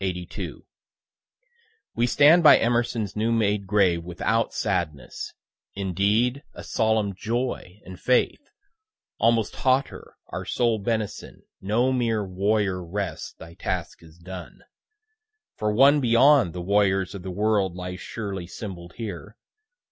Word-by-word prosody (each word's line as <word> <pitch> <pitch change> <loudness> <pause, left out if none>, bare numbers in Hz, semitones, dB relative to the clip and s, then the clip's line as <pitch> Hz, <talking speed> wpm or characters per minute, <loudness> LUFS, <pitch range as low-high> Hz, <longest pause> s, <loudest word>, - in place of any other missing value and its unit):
_ 90 -2 -5 1.3
We 120 +1 +1
stand 150 +7 +6
by 155 - +8
Emerson's 120 -3 0
new 110 +2 0
made 105 -3 +1
grave 95 -4 +2
without 95 +6 -1
sadness 85 -8 -3 0.4
indeed 100 +7 +1
a - - -9
solemn 110 -3 0
joy 110 -2 -3
and 95 -1 -10
faith, 125 - +1 0.8
almost 115 -2 +2
hauteur 130 +1 0
our - - -5
soul 115 -3 0
benison 110 0 -4 0.2
no 115 +7 +1
mere 115 -4 0
"Warrior, 95 0 0
rest, 90 -1 -5
thy 80 0 -12
task 90 -1 -4
is 80 0 -17
done," 90 0 -10 0.9
for 105 -1 -1
one 140 +6 +5
beyond 125 - +5
the 90 - -5
warriors 95 0 +2
of 100 - -7
the 95 - -6
world 100 -1 0
lies 90 0 -6
surely 100 -6 -5
symboll'd 90 -5 -8
here. 105 -2 -7
105 Hz, 125 wpm, -25 LUFS, 90-115 Hz, 1.3 s, by